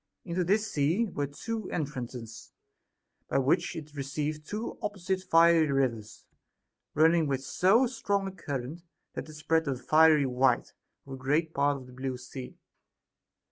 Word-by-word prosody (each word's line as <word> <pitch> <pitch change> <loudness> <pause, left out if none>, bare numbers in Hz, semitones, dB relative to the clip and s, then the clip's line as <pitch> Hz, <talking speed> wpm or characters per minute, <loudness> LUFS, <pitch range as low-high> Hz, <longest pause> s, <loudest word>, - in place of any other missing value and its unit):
Into 175 +2 -1
this 205 +5 +2
sea 160 +10 +1
were 145 -9 -3
two 220 +9 -5
entrances, 125 -7 -5 0.8
by - - +1
which 135 +1 +1
it 155 -2 -8
received 150 +2 -3
two 215 +2 -5
opposite 190 -2 -2
fiery 165 -3 +5
rivers, 115 -6 -1 0.7
running 160 +1 +4
in - - -2
with 135 -1 -1
so 190 - +3
strong 200 -5 -1
a - - -4
current, 145 -3 -5 0.3
that - - -6
it - - -10
spread 160 +1 0
a 135 - 0
fiery 155 +3 +5
white 125 -1 +1 0.3
over 135 -1 -7
a - - -16
great 155 +5 0
part 140 0 +2
of 130 - -11
the 125 - -14
blue 130 0 -4
sea. 125 +1 -9
150 Hz, 155 wpm, -29 LUFS, 135-170 Hz, 0.8 s, fiery